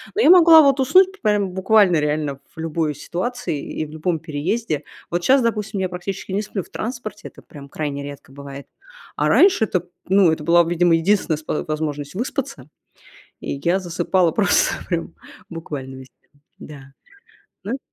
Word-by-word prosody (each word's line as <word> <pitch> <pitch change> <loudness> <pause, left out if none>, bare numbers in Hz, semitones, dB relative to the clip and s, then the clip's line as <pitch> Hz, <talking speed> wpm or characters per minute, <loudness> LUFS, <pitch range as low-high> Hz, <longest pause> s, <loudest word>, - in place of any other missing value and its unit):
Но 425 - +1
я 325 - +5
могла 335 -3 +8
вот 275 -1 +3
уснуть 375 +9 +4
прям 205 -2 +1
буквально 190 -2 +3
реально 150 -2 -2 0.2
в - - -12
любой 160 -1 -2
ситуации 240 - -4 0.2
и - - -1
в - - -12
любом 160 +1 -2
переезде. 160 +2 -3 0.3
Вот 175 0 -1
щас, 265 0 +4
допустим, 215 -3 -2
я 185 - -1
практически 185 +2 -6
не 205 - 0
сплю 195 -1 -4
в - - -20
транспорте, 220 -3 -6
это - - -17
прям 140 -2 -13
крайне 140 -1 -4
редко 140 -2 -10
бывает, 140 0 -10 0.5
а - - +1
раньше 380 - +5
это, 180 -4 -2 0.2
ну, 190 -3 +5
это 155 -1 -3
была, 170 +1 +5
видимо, 170 0 +2
единственная 165 -2 +1
спо 155 -1 -3
возможность 150 -2 -4
выспаться, 240 - -4 0.7
и - - -5
я 175 +3 +2
засыпала 175 0 0
просто 200 -1 +2 0.2
прям 170 -1 -3 0.4
буквально 145 -5 -7
везде. 130 0 -13 0.5
Да. 140 -2 -12 0.7
Ну 235 +8 -4
175 Hz, 165 wpm, -21 LUFS, 150-215 Hz, 0.7 s, могла